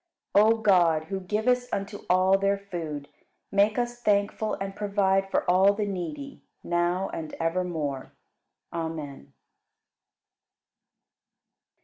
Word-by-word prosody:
57. 215 +2 +6
O - - -11
God, 175 -6 +4
who 195 -1 -2
givest 245 +6 0
unto 200 +1 -3
all 185 +1 +4
their 200 +1 +1
food, 165 -7 -6 0.4
make 205 +2 +3
us 240 0 -2
thankful 210 0 +1
and 195 0 -5
provide 195 -2 +1
for - - 0
all 190 +3 +5
the 210 0 -1
needy, 265 - -5 0.2
now 175 +2 0
and 160 -2 -6
evermore. 165 -5 -2 0.6
Amen. 160 - -5
195 Hz, 110 wpm, -27 LUFS, 175-205 Hz, 0.6 s, 57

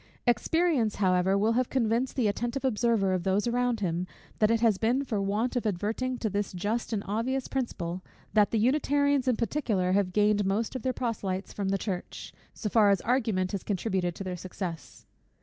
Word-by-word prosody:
Experience, 250 - +2
however, 185 0 +2
will 215 +3 +2
have 245 +1 +1
convinced 240 0 0
the 245 -5 +2
attentive 240 +6 -2
observer 225 -5 +2
of 185 - 0
those 190 +4 +1
around 240 -1 0
him, 180 -1 -1 0.3
that 215 - +4
it 230 0 +3
has 225 -4 +3
been 245 +5 +1
for 220 -7 -2
want 210 +6 -1
of 245 - 0
adverting 220 +6 -1
to 230 - -2
this 205 -1 -2
just 210 +7 -2
and 210 -3 -1
obvious 240 +6 -1
principle, 185 -9 -3 0.3
that 210 -2 +4
the 225 - 0
Unitarians 285 +3 +2
in 250 - +3
particular 220 -6 0
have 190 -1 +2
gained 210 +1 +3
most 205 +6 -1
of 260 - -3
their 260 - 0
proselytes 205 -6 -3
from 200 -2 -2
the 195 - +1
Church, 190 -3 -5 0.2
so 215 - -5
far 210 -1 +4
as 200 -2 +3
argument 220 -7 0
has 200 - -3
contributed 185 -3 -1
to - - -6
their 185 -1 -4
success. 180 -3 -7
215 Hz, 190 wpm, -28 LUFS, 195-245 Hz, 0.3 s, that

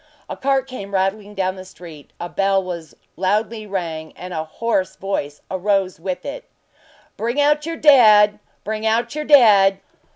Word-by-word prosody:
A - - -6
cart 270 -1 0
came 200 -7 -7
rattling 200 +2 -2
along 185 0 -1
the 185 - -8
street, 170 -5 -13
a 175 - -4
bell 195 +1 +1
was 170 -3 -7 0.2
loudly 215 +4 -1
rang, 165 -5 -5
and 180 0 -8
a 160 -1 -2
hoarse 190 +3 -2
voice 150 -7 -4
arose 190 -1 0
with 185 +1 -5
it: 285 +1 -7 0.7
"Bring 235 +5 -2
out 295 +1 +2
your 330 0 -4
dead! 215 -8 +6 0.2
Bring 215 +1 -4
out 235 +3 0
your 305 0 -4
dead!" 205 -9 +6
200 Hz, 160 wpm, -20 LUFS, 185-230 Hz, 0.7 s, dead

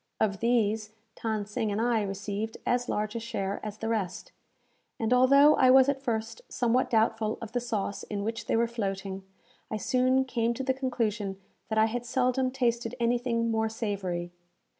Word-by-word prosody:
Of 200 -3 +1
these, 220 -2 +1 0.3
Than 220 -2 -1
Sing 210 +1 -2
and 205 - -1
I 230 -1 +2
received 205 +2 -4
as 245 0 0
large 210 +1 -1
a - - -1
share 200 -3 -3
as 215 0 -5
the 225 - -4
rest, 210 -6 -2 0.7
and 225 +2 +1
although 275 +4 +7
I 255 - +5
was 265 +1 +7
at 275 -1 -1
first 225 -3 -3
somewhat 245 +1 +1
doubtful 220 -1 +1
of 225 -1 -7
the 245 - 0
sauce 220 -4 -3
in 205 -1 -4
which 225 +2 -4
they - - +1
were 230 +1 +3
floating, 195 -4 -4 0.5
I 215 - -2
soon 255 +3 +2
came 235 -2 0
to 265 - -3
the 260 0 +1
conclusion 230 -7 -2 0.3
that 220 - -1
I 220 - +6
had 235 +2 -2
seldom 255 +1 +1
tasted 240 -2 -1
anything 235 -1 +1
more 220 0 +1
savoury. 190 -6 -3
225 Hz, 180 wpm, -28 LUFS, 210-245 Hz, 0.7 s, although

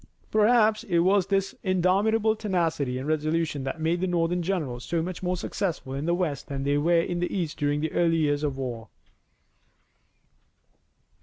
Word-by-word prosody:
Perhaps 215 0 +4
it 175 -6 0
was 185 +2 +3
this 195 0 0
indomitable 205 +4 +2
tenacity 165 - -1
and 130 +3 -5
resolution 155 -1 0
that 135 +4 -4
made 165 +2 0
the 185 - +1
Northern 175 0 0
generals 155 -10 -2
so 170 +5 -1
much 180 0 -5
more 180 0 -1
successful 170 -7 -3
in 140 +4 -3
the 170 - +2
west 160 -7 -2
than 140 -2 -4
they 145 +1 +1
were 170 +2 +3
in 175 +1 -3
the 175 - -1
east 170 -6 -3
during 145 0 0
the 160 0 -2
early 165 -1 +2
years 145 -2 +1
of 145 -3 -1
the 135 - -5
war. 115 -4 -5
170 Hz, 175 wpm, -26 LUFS, 145-185 Hz, -, Perhaps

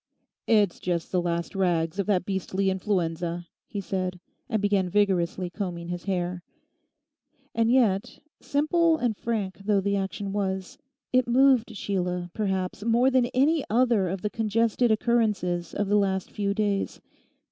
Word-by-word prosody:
'It's 205 -5 +3
just 170 -2 -2
the 180 - +2
last 170 -1 -2
rags 175 -2 0
of 200 - 0
that 185 -4 +1
beastly 190 0 -1
influenza,' 175 -3 -2 0.2
he 205 - -5
said, 185 -2 -3 0.3
and 220 - +1
began 200 -2 +1
vigorously 185 -2 +1
combing 175 -2 -5
his 175 0 -5
hair. 180 -2 -2 1.1
And 230 0 +2
yet, 235 -3 +2 0.2
simple 320 +3 +2
and 240 -6 0
frank 205 -4 -3
though 200 0 +1
the 200 +1 0
action 195 +1 -3
was, 190 0 -3 0.3
it 255 -1 +3
moved 250 -2 +4
Sheila, 180 -3 -2
perhaps, 190 -1 -2
more 235 +3 +3
than 255 -2 +3
any 285 +5 +2
other 230 -5 +3
of 190 +2 -4
the 210 - -1
congested 230 +2 +1
occurrences 210 -7 +1
of 205 - -2
the 205 +1 +3
last 190 -2 0
few 200 -1 -1
days. 205 -2 -1
200 Hz, 145 wpm, -26 LUFS, 180-225 Hz, 1.1 s, moved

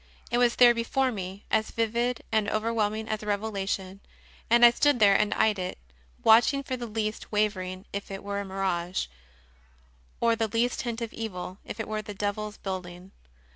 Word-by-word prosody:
It 240 - +2
was 240 -1 +3
there 240 -1 +7
before 255 +3 0
me, 195 -2 -6
as 220 0 +2
vivid 235 +2 -1
and 220 -2 +2
overwhelming 220 0 -1
as 215 -1 -2
a 210 - -8
revelation, 195 -2 -2 0.5
and 240 +1 +7
I 240 - +9
stood 290 +3 +3
there 200 -2 +6
and 210 +1 +2
eyed 215 -3 +2
it, 180 0 -4 0.5
watch 225 +4 +7
ing 275 - -3
for 260 - -3
the 240 -1 -5
least 215 -1 -3
wavering 190 -3 -1
if 200 0 -4
it 195 -1 -6
were 200 0 -3
a - - -2
mirage, 190 -2 -1 1.1
or 230 -1 +3
the 225 0 0
least 230 +3 0
hint 235 -1 -4
of 230 - -4
evil 185 -4 -6
if 225 - -8
it 220 - -3
were 215 0 -2
of 215 - -7
the 210 - -7
devil 205 +1 -2
s 210 - -11
building. 185 -1 -6
215 Hz, 195 wpm, -27 LUFS, 195-230 Hz, 1.1 s, I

